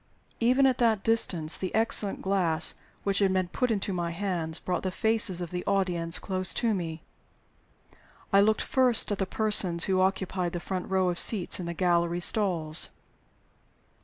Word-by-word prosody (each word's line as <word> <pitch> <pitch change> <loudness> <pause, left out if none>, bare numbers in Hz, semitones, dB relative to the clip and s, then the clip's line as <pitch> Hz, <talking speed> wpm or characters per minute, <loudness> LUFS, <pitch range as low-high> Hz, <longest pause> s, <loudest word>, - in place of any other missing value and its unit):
Even 255 +4 +3
at 260 -2 +1
that 225 -4 +1
distance, 175 -8 0
the 185 0 -4
excellent 220 -2 +1
glass 185 -5 +4 0.3
which 200 -1 0
had 195 -2 +2
been 185 -2 -1
put 250 +6 -2
into 205 -3 -2
my 175 -1 -3
hands 170 -3 -3
brought 180 -1 -3
the 190 - -3
faces 210 -2 0
of 175 - -6
the 180 0 -4
audience 180 -4 0
close 185 -1 -2
to 230 -2 0
me. 165 -4 -5 1.3
I 195 - +6
looked 215 +1 +1
first 250 -5 +3
at 205 - -3
the 195 - -1
persons 195 -6 +3
who 190 -1 +1
occupied 190 -2 -2
the 175 - -3
front 185 +1 -5
row 190 -1 +1
of 175 - -3
seats 195 -5 +1
in 175 - -5
the 170 - -5
gallery 170 -1 0
stalls. 170 -4 +1
185 Hz, 170 wpm, -27 LUFS, 175-205 Hz, 1.3 s, I